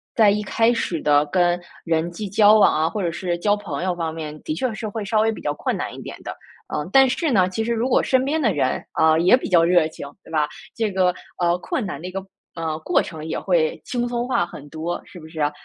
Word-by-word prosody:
在 215 -3 +6
一 210 +1 +1
开 225 +4 +2
始 170 -8 -2
的 145 0 +4
跟 175 +2 +2 0.3
人 165 0 0
际 205 +2 -6
交 210 +2 +6
往 - - +5
啊 155 +1 +1
或 210 - -3
者 170 -3 0
是 175 0 -2
交 205 +3 +2
朋 170 -7 -5
友 185 -1 0
方 165 -2 -3
面 155 -2 -6
的 - - -2
确 240 +10 -1
是 215 0 -5
会 215 +1 -4
稍 215 +2 +1
微 225 +1 +2
比 - - -8
较 145 - -1
困 - - -2
难 - - -4
一 - - -9
点 - - -9
的。 - - -6 0.3
呃， 150 +1 -3
但 270 0 +6
是 300 +5 0
呢， 185 -4 +3
其 220 +4 -2
实 235 - -2
如 230 +3 0
果 - - +4
身 260 0 +2
边 310 +3 0
的 220 -7 +2
人， 140 -4 0 0.2
呃， 160 0 +5
也 180 +8 +6
比 - - -5
较 170 -2 +5
热 170 -2 +4
情， 150 - -9 0.2
对 - - -15
吧？ 150 -2 +1 0.3
这 225 -2 0
个， 185 -1 +2 0.3
呃， 175 0 +2
困 215 +4 -3
难 150 -6 -5
的 180 - -6
一 185 - -6
个， 195 0 -5 0.3
呃， 160 -1 -3
过 175 +3 +2
程 160 -3 -8
也 - - -2
会 170 -4 +1
轻 245 -1 -2
松 240 0 -2
化 250 -9 +1
很 145 -4 -11
多， 160 +3 -4
是 180 - -12
不 155 - -11
是 160 -1 -6
啊？ 145 - +2
180 Hz, 285 characters per minute, -22 LUFS, 160-215 Hz, 0.3 s, 在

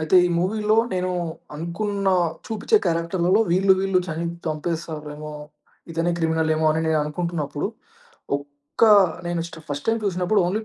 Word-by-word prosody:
అయితే 155 +3 +3
ఈ - - 0
మూవీలో, 210 +4 +1 0.2
నేను 185 0 -1 0.4
అనుకున్న 195 +5 -2 0.4
చూపించే 225 - +1
క్యారెక్టర్‌లలో 170 +4 +2
వీళ్ళు, 190 +2 +5
వీళ్ళు 195 -1 +2
చని 165 +1 -3 0.2
చంపేస్తారేమో, 155 -1 -4 0.6
ఇతనే 165 +1 0
క్రిమినలేమో 160 -1 +1
అని 160 - +1
నేననుకుంటున్నప్పుడు, 155 0 -1 0.7
ఒక్క 145 +3 -10 0.4
నేను 175 -1 -1
స్ట 165 - -12
ఫస్ట్ 145 0 -4
టైమ్ 225 0 +2
చూసినప్పుడు 185 +2 +1
ఓన్లీ 195 +5 0
170 Hz, 125 wpm, -23 LUFS, 155-190 Hz, 0.7 s, వీళ్ళు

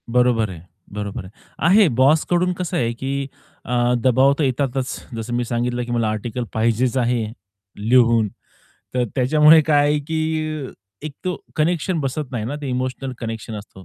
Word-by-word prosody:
बरोबर 120 -3 +2
आहे. 85 -4 -9 0.3
बरोबर 100 -2 -5
आहे. 95 - -12 0.4
आहे. 200 +2 +6
बॉस 135 +5 +4
कडून 180 +1 +2
कसं 180 0 -3
आहे, 120 -7 +1
की 135 +3 -3 0.4
अ, 120 0 +1
दबाव 130 +2 +4
तर 155 - 0
येतातच 130 -1 -1 0.2
जसं 115 +1 -5
मी 120 - 0
सांगितलं, 120 +1 -1
की 120 - -6
मला 115 -2 +1
आर्टिकल 110 +3 -3
पाहिजेच 115 +3 +1
आहे 120 -2 +1 0.6
लिहून 115 0 +4 0.7
तर 125 -1 +2
त्याच्यामुळे 150 +5 +6
काय 145 -1 +3
आहे, 150 - +2
की 155 -1 -2 0.4
एक 155 - -6
तो 180 -1 -1 0.2
कनेक्शन 170 +2 0
बसत 135 0 -3
नाही 115 -4 -2
ना 125 +6 -3
ते 145 - -5
इमोशनल 130 +1 -3
कनेक्शन 115 -1 -5
असतो. 100 -2 -10
125 Hz, 165 wpm, -21 LUFS, 115-150 Hz, 0.7 s, आहे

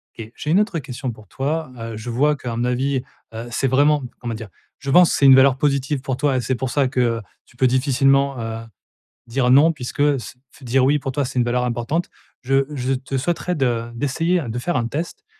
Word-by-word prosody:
Et 115 0 -9
j'ai 150 - -3
une 180 - +5
autre 210 -6 0
question 130 -1 -5
pour 110 -2 -15
toi, 150 - -3
heu, 115 -1 -6
je 110 +3 -7
vois 145 +6 +2
qu'à 120 -4 -5
mon 120 - -1
avis, 130 +2 0 0.3
heu, 115 +2 -6
c'est 135 +3 0
vraiment 145 +2 +3 0.2
comment 120 -2 -4
dire? 110 -2 -7 0.3
Je 135 - -4
pense 175 +3 +6
c'est 140 - +2
une 135 -1 +9
valeur 130 0 +5
positive 140 0 0
pour 130 -1 -3
toi 140 -2 +1
et - - 0
c'est 130 +1 -1
pour 130 +2 -3
ça 135 +1 +1
que, 120 -3 0 0.2
tu 125 - -24
peux 130 -1 +4
difficilement, 135 +1 +2
heu, 115 -1 -4 0.7
dire: 125 +1 0
«Non» 145 +5 +6
puisque, 130 0 -5 0.2
se 120 - -10
f - - -18
dire: 130 +1 +2
«Oui» 145 +2 +3
pour 135 0 -4
toi, 140 +1 -1
c'est 125 - -3
une 120 - +2
valeur 125 +1 0
importante. 125 +8 -2 0.3
Je 135 +1 +2
je 130 -1 -1
te 135 +1 -3
souhaiterais 175 +5 -1
de 120 -4 -1
d'essayer 165 +8 0
de 115 +2 -3
faire 175 +8 -2
un 115 -2 -1
test, 170 - -5
130 Hz, 225 wpm, -21 LUFS, 120-145 Hz, 0.7 s, une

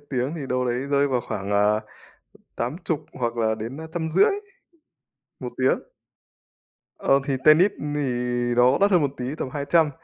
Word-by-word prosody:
tiếng 130 +4 -1
thì 140 -4 -5
đâu 125 0 0
đấy 125 +2 -2
rơi 140 0 +3
vào 125 -2 0
khoảng, 100 -3 -5
à, 105 +1 +3 0.8
80 150 +5 -2
hoặc 120 -2 -3
là 110 -1 +1
đến 115 +5 -6 0.2
150 170 +3 +2 1.1
1 - - -5
tiếng. - - +2 1.2
Ờ, 135 0 +3
thì 140 - +1
tennis 170 +7 +6 0.2
thì 150 - 0 0.5
nó 125 +2 +5
đắt 200 0 +4
hơn 175 -4 +5
một 140 - 0
tí, 125 - -4
tầm 130 - -3
200. 150 +2 +2
135 Hz, 155 wpm, -24 LUFS, 120-155 Hz, 1.2 s, tennis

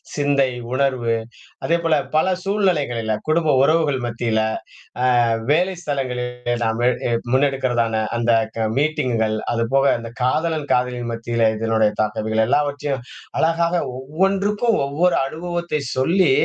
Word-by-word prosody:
சிந்தை, 140 -2 +2 0.2
உணர்வு. 130 -4 +1 0.5
அதேபோல 165 -3 +2 0.2
பல 185 +4 +3
சூழ்நிலைகளில 150 - 0
குடும்ப 155 -3 +3
உறவுகள் 150 -3 +2
மத்தியில, 115 -1 0 0.8
ஆ - - 0 0.2
வேலைஸ்தலங்களில் 130 -9 -1
நாம 110 +1 -1 0.5
முன்னெடுக்கிறதான 125 -5 +1
அந்த 120 0 -1 0.3
க 110 -1 0
மீட்டிங்குகள் 125 -8 0 0.2
அதுபோக 135 +4 +1
அந்தக் 115 +1 -9
காதலன், 155 +2 0
காதலி 125 0 0
மத்தியில 115 -1 +1
இதனுடைய 110 -1 +2
தாக்க 105 0 -3
இவைகள 110 0 +2
எல்லாவற்றையும் 145 -2 0 0.4
அழகாக 170 +1 +1 0.2
ஒவ்வொன்றுக்கும் 195 - +1
ஒவ்வொரு 170 +5 +2
அனுபவத்தைச் 170 -1 -3
சொல்லி 170 +4 +3
135 Hz, 105 wpm, -21 LUFS, 115-165 Hz, 0.8 s, பல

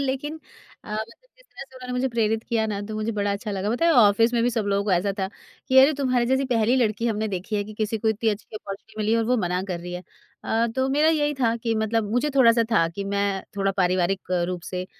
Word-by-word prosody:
लेकिन 280 +3 -3 0.5
अ, 210 - -8
मतलब 230 - -6
जिस - - -22
तरह - - -11
से 265 - -23
उन्होंने 250 -1 -7
मुझे 250 +1 0
प्रेरित 225 -2 0
किया 225 -2 +1
ना, 205 -2 -3
तो 215 +1 -6
मुझे 215 +1 -2
बड़ा 205 -1 -1
अच्छा 205 +2 -4
लगा। 200 +1 -2
पता 245 +8 0
है? 335 - +5
ऑफ़िस 225 -1 +5
में 235 - +2
भी 245 - +2
सब 220 -3 -2
लोगों 200 0 +1
को 200 - 0
ऐसा 190 +3 +1
था 190 0 -1 0.4
कि, 260 0 +5
"अरे! 275 +4 +7
तुम्हारे 255 -3 +1
जैसी 265 +2 +1
पहली 230 +2 +2
लड़की 230 -2 +1
हमने 220 -1 -1
देखी 195 +2 -3
है 205 - -1
कि 215 +1 -10
किसी 220 +1 -2
को 220 - 0
इतनी 220 +1 0
अच्छी 210 +1 -7
ऑपर्च्युनिटी 205 +2 -9
मिली 215 +1 +1
है 230 - +3
और 225 - +1
वो 250 +2 +2
मना 180 +1 -1
कर 175 -2 -3
रही 175 0 -7
है।" 180 - -6 0.4
अ, 230 +1 +1
तो 260 0 +1
मेरा 295 +3 +3
यही 295 -2 +1
था 230 -2 +2
कि 230 -1 -2
मतलब 220 -1 -1
मुझे 290 +5 +1
थोड़ा-सा 230 -3 +5
था 165 -6 +4
कि 195 +4 -6
मैं 200 -1 0
थोड़ा 195 0 +1
पारिवारिक 185 0 0 0.2
रूप 180 -2 -4
से 180 0 -4
220 Hz, 260 wpm, -24 LUFS, 200-245 Hz, 0.5 s, अरे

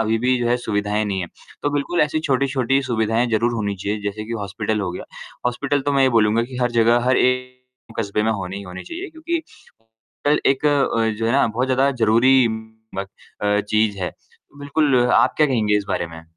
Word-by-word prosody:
अभी 110 0 +1
भी 130 0 +3
जो 120 - 0
है 120 - +3
सुविधाएँ 105 0 0
नहीं 100 -2 -2
है। 90 - -3 0.4
तो 145 - +1
बिल्कुल 145 +4 -1
ऐसी 150 +1 0
छोटी-छोटी 135 0 +1
सुविधाएँ 115 +1 +1
ज़रूर 115 +2 +2
होनी 100 -3 -2
चाहिए 105 +2 -3
जैसे 105 +1 -4
कि 115 - -6
हॉस्पिटल 105 +2 -2
हो 95 -3 -2
गया। 90 - -7 0.4
हॉस्पिटल 140 +3 0
तो 145 - +2
मैं 135 -1 +3
ये 135 - +5
बोलूँगा 110 +1 +3
कि 125 +1 -9
हर 125 - +1
जगह 115 +1 +4
हर 130 - +4
एक 125 0 +1 0.4
कस्बे 105 -1 0
में 110 +1 +2
होनी 95 -2 -5
ही 100 - -6
होनी 90 -1 -8
चाहिए 355 +4 -6
क्योंकि 320 +2 -3
हॉस्पिटल 115 - -5
एक 135 -1 0 0.6
जो 115 - -1
है 115 - +1
ना 140 - +4
बहुत 120 +4 -1
ज़्यादा 130 +1 +2
ज़रूरी 120 +4 +5
म 110 -2 -7 0.4
चीज़ 105 0 +1
है। 90 -2 -2 0.5
बिल्कुल 145 -1 +1 0.2
आप - - +4
क्या 155 - +4
कहेंगे 110 -6 +1
इस 100 - -5
बारे 85 - -1
में? 80 0 -11
115 Hz, 200 wpm, -21 LUFS, 105-135 Hz, 0.6 s, ये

